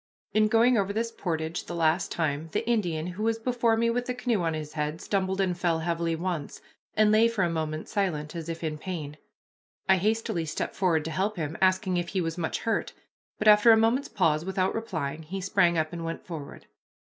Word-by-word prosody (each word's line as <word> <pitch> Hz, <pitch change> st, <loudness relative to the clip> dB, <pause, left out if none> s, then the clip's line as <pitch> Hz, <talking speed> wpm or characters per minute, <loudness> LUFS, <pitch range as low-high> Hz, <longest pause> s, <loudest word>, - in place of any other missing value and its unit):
In 215 Hz, 0 st, +4 dB
going 230 Hz, +2 st, +4 dB
over 200 Hz, 0 st, 0 dB
this 230 Hz, +2 st, -1 dB
portage 165 Hz, -6 st, -3 dB
the 175 Hz, -, -6 dB
last 165 Hz, +2 st, +1 dB
time, 155 Hz, -1 st, -1 dB
the 230 Hz, -, -1 dB
Indian, 175 Hz, -9 st, 0 dB
who 180 Hz, +3 st, -6 dB
was 225 Hz, +1 st, +1 dB
before 235 Hz, -1 st, +1 dB
me 230 Hz, +1 st, +2 dB
with 245 Hz, +1 st, -2 dB
the 250 Hz, -, -2 dB
canoe 245 Hz, -5 st, 0 dB
on 165 Hz, -2 st, 0 dB
his 155 Hz, -1 st, -6 dB
head, 150 Hz, +1 st, -2 dB
stumbled 190 Hz, 0 st, -1 dB
and 185 Hz, -2 st, +1 dB
fell 170 Hz, -2 st, 0 dB
heavily 170 Hz, 0 st, -1 dB
once, 170 Hz, -3 st, -4 dB, 0.4 s
and 215 Hz, 0 st, +4 dB
lay 220 Hz, +2 st, +5 dB
for 230 Hz, -5 st, 0 dB
a 170 Hz, -, +1 dB
moment 155 Hz, -1 st, -3 dB
silent 170 Hz, -7 st, -2 dB
as 165 Hz, -1 st, -5 dB
if 165 Hz, 0 st, -5 dB
in 155 Hz, -1 st, -3 dB
pain. 155 Hz, -5 st, -5 dB, 0.7 s
I 190 Hz, -, +5 dB
hastily 210 Hz, -4 st, 0 dB
stepped 155 Hz, -, -3 dB
forward 170 Hz, -5 st, +1 dB
to 160 Hz, -, -3 dB
help 195 Hz, +6 st, -1 dB
him, 155 Hz, -1 st, -3 dB
asking 185 Hz, 0 st, +2 dB
if 175 Hz, 0 st, -1 dB
he 190 Hz, -, -2 dB
was 165 Hz, -1 st, -2 dB
much 170 Hz, -3 st, -2 dB
hurt, 225 Hz, -1 st, -1 dB, 0.4 s
but 215 Hz, -, -1 dB
after 210 Hz, +2 st, +8 dB
a 225 Hz, -, +7 dB
moment's 230 Hz, +5 st, +2 dB
pause, 165 Hz, -8 st, +1 dB
without 190 Hz, 0 st, 0 dB
replying, 165 Hz, -10 st, -3 dB
he 180 Hz, +5 st, -5 dB
sprang 185 Hz, -2 st, +2 dB
up 155 Hz, +1 st, -1 dB
and 170 Hz, -1 st, -5 dB
went 165 Hz, 0 st, -5 dB
forward. 155 Hz, -5 st, -8 dB
180 Hz, 215 wpm, -27 LUFS, 160-215 Hz, 0.7 s, after